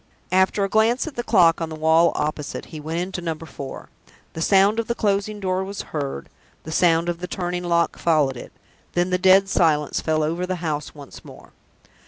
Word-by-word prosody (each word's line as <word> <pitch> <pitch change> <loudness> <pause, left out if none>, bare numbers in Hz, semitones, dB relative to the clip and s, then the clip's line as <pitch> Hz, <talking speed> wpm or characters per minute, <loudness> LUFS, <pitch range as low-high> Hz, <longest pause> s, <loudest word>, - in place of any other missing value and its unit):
After 190 +2 +2
a - - +1
glance 220 +5 +2
at 315 -4 -7
the 240 - -2
clock 175 -8 +4
on 165 - -2
the 160 - -6
wall 160 +2 +4
opposite, 150 -1 -3
he 155 - -6
went 160 +3 -4
into 180 0 -4
Number 165 -1 -4
Four. 140 -3 -9 0.4
The 160 - -6
sound 200 +5 +4
of 230 - -2
the 235 - -1
closing 205 -1 -1
door 185 -1 -1
was 195 +1 -6
heard, 140 - -4 0.4
the 160 - -8
sound 165 0 +3
of 170 -1 -2
the 180 - -5
turning 180 -1 -3
lock 170 -1 +1
followed 150 -5 +2
it. 120 - -10 0.4
Then 175 +1 0
the 180 - +1
dead 190 +1 +5
silence 155 -6 +1
fell 155 -1 0
over 170 +4 -2
the 185 - -1
house 150 -2 -3
once 145 -2 -12
more. - - -14
175 Hz, 205 wpm, -22 LUFS, 160-190 Hz, 0.4 s, dead